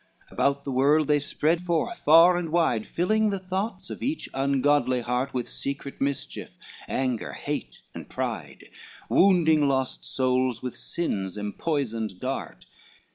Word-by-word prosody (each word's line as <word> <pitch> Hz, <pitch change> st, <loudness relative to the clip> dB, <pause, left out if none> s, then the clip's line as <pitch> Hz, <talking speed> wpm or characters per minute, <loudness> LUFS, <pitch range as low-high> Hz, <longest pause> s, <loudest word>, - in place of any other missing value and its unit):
XIX -, -, -32 dB
About 140 Hz, 0 st, +1 dB
the 140 Hz, -, -4 dB
world 140 Hz, +4 st, +3 dB
they 150 Hz, -1 st, +4 dB
spread 155 Hz, +4 st, 0 dB
forth 170 Hz, -3 st, -1 dB
far 165 Hz, +4 st, +7 dB
and 175 Hz, -2 st, -2 dB
wide, 155 Hz, -10 st, +1 dB
Filling 215 Hz, +5 st, +1 dB
the 200 Hz, -, -1 dB
thoughts 190 Hz, +1 st, -4 dB
of -, -, -7 dB
each 290 Hz, +5 st, -2 dB
ungodly 135 Hz, -1 st, +2 dB
heart 125 Hz, +3 st, -1 dB
With 125 Hz, -2 st, -3 dB
secret 140 Hz, 0 st, -5 dB
mischief, 140 Hz, -1 st, -3 dB, 0.3 s
anger, 130 Hz, -4 st, -2 dB
hate -, -, -5 dB
and -, -, -9 dB
pride, -, -, -5 dB, 0.4 s
Wounding 160 Hz, -6 st, +4 dB
lost 130 Hz, -1 st, -1 dB
souls 130 Hz, -1 st, 0 dB
with 125 Hz, -, -4 dB
sin's 100 Hz, -, -3 dB
empoisoned 110 Hz, -, -2 dB
dart. -, -, -5 dB
140 Hz, 140 wpm, -26 LUFS, 130-170 Hz, 0.4 s, far